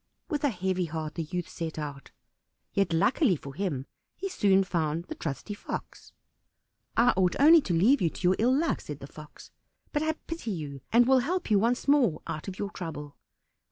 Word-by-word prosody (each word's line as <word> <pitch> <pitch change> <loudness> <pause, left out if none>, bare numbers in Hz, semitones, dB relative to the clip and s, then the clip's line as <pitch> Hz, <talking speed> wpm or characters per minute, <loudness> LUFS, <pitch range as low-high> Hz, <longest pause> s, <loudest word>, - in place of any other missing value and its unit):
With 295 -1 -2
a 290 - +4
heavy 185 -3 -1
heart 155 -1 -4
the 170 - -3
youth 175 +1 -4
set 165 -1 -5
out; 145 -2 -6 0.6
yet 195 -3 +1
luckily 190 - +3
for 140 -2 -9
him 155 -9 -2 0.3
he 390 - -4
soon 195 - +3
found 165 -3 -1
the - - -6
trusty 150 - -5
Fox. 205 - -7 0.9
"I 240 +1 +5
ought 185 -2 +2
only 315 +3 +8
to 185 - -2
leave 235 +12 +4
you 170 - +3
to - - -10
your 180 +1 +4
ill 250 +4 +3
luck," 330 +2 0
said 150 - -7
the 135 - -8
Fox, 150 +2 -13 0.4
"but 295 - 0
I 315 0 +1
pity 330 -8 -5
you, 145 -8 -5
and 240 +2 +6
will 265 0 +6
help 345 +2 -2
you 205 - +5
once 240 +6 0
more 255 - +3
out 155 - -5
of 190 -1 -6
your 205 -1 -3
trouble. 150 -6 -7
190 Hz, 195 wpm, -28 LUFS, 155-245 Hz, 0.9 s, only